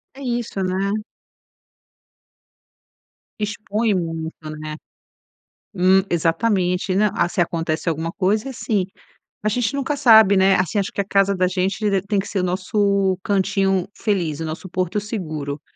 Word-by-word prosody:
É 275 - -11
isso, 240 -6 -2
né? 195 +3 -1 2.4
Expõe 210 +1 -1
muito, 165 -2 -2 0.3
né, 155 0 -5 1.0
hum, 190 +1 +4
exatamente 180 +2 +1
né. 210 +1 +3
Ah, 170 - +1
se 180 - -2
acontece 165 -1 -1
alguma 165 +1 -1
coisa 210 +7 0
é - - -4
assim, 210 -6 -1 0.6
a 215 - +1
gente 245 +4 0
nunca 280 +1 -1
sabe, 220 -6 +7
né, 190 0 +5
assim, 185 +2 0
acho 195 - -2
que - - -1
a 195 - -5
casa 195 0 +2
da 185 0 +2
gente 190 +3 0
d 195 -1 +1
tem 200 +1 -1
que 200 - -3
ser 200 - -2
o 180 - 0
nosso 195 +1 +1
cantinho 195 -1 +1
feliz, 175 -9 -1
o 160 - -3
nosso 160 +4 -6
porto 185 +3 -1
seguro. 155 -9 -5
195 Hz, 150 wpm, -21 LUFS, 180-210 Hz, 2.4 s, sabe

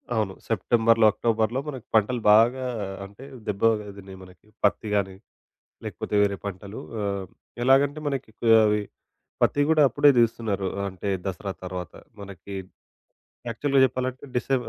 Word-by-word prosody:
అవును. 105 -4 0 0.2
సెప్టెంబర్‌లో, 115 -1 +3
అక్టోబర్‌లో 115 +2 0
మనకి 130 -6 -6
పంటలు 115 +3 +2
బాగా 120 +5 +4 0.4
అంటే 100 +6 -14 0.2
దెబ్బ 100 -1 -3 0.4
దిన్నాయి 95 -1 -11
మనకి 90 +2 -18 0.2
పత్తి 105 +1 +1
గానీ, 95 -2 -1 0.7
లేకపోతే - - -5
వేరే 100 -1 +1
పంటలు 100 +1 -7 0.2
ఆహ్, 100 -1 -3 0.4
ఎలాగంటే 140 +4 +3
మనకి 135 -5 -4
కో 115 - 0 0.2
అవి 105 0 +2 0.6
పత్తి 145 - +3
గూడా 160 -1 +4
అప్పుడే 145 +2 +5
దీస్తున్నారు. 110 -4 0 0.2
అంటే 95 +1 -6 0.2
దసరా 95 +1 -4
తర్వాత 90 -2 -6 0.3
మనకి 100 0 -10 1.0
యాక్చువల్‌గా 135 +3 +2
జెప్పాలంటే, 130 +1 -4
డిసె 135 +2 0
110 Hz, 125 wpm, -25 LUFS, 100-125 Hz, 1.0 s, అప్పుడే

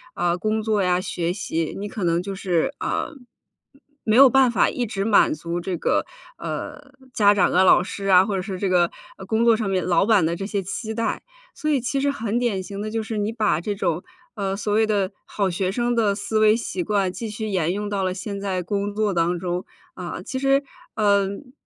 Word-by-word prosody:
呃， 175 0 +1
工 215 +2 0
作 215 -2 +1
呀， 180 -1 +2
学 175 -2 -2
习， 165 -5 -3
你 205 +1 -4
可 205 -1 -5
能 170 0 +2
就 200 - -4
是， 180 -4 0
啊， - - -2 0.9
没 215 - +2
有 275 -1 +9
办 265 0 +5
法 210 - +3
一 245 - -2
直 200 -2 -3
满 215 -3 +4
足 170 +3 -4
这 180 0 -3
个， - - +1 0.3
呃， 285 -1 -6 0.2
家 205 -4 +5
长 200 - +2
啊、 185 - +5
老 180 -1 +6
师 195 +1 -6
啊， 185 -1 +6
或 200 -1 -2
者 190 - -1
是 190 0 -5
这 195 - 0
个， 175 -2 +3 0.3
呃， 190 - -9
工 220 +4 +1
作 230 -1 +6
上 215 -3 -2
面 185 -1 0
老 175 +1 +3
板 210 -6 +4
的 165 +1 0
这 195 - -5
些 205 -2 -1
期 215 +4 -4
待， 230 0 -2 0.3
所 305 - -3
以 285 - +3
其 255 +3 -1
实 280 0 +2
很 230 -4 -2
典 225 -6 0
型 200 +2 -6
的 215 - -3
就 225 0 -1
是， 220 0 -4
你 210 +2 -1
把 210 -8 +1
这 205 +3 -2
种， 175 -3 -1 0.3
呃， 195 -2 -2
所 205 0 -2
谓 220 +1 +4
的 200 -3 0
好 200 -2 -1
学 185 +1 -1
生 240 +3 0
的 215 -3 +2
思 215 +2 -1
维 215 0 +5
习 210 -6 -3
惯 195 -1 0
继 225 +2 -5
续 215 +1 -4
沿 180 -5 0
用 205 +2 -3
到 200 -2 -1
了 185 -1 0
现 200 +2 -5
在 190 -2 -1
工 200 +3 -2
作 210 -1 0
当 175 0 +1
中， 180 0 -3 0.3
啊。 180 0 -6
其 260 - -4
实， 275 +1 +3 0.3
嗯， 200 +3 +1
200 Hz, 245 characters per minute, -23 LUFS, 185-220 Hz, 0.9 s, 有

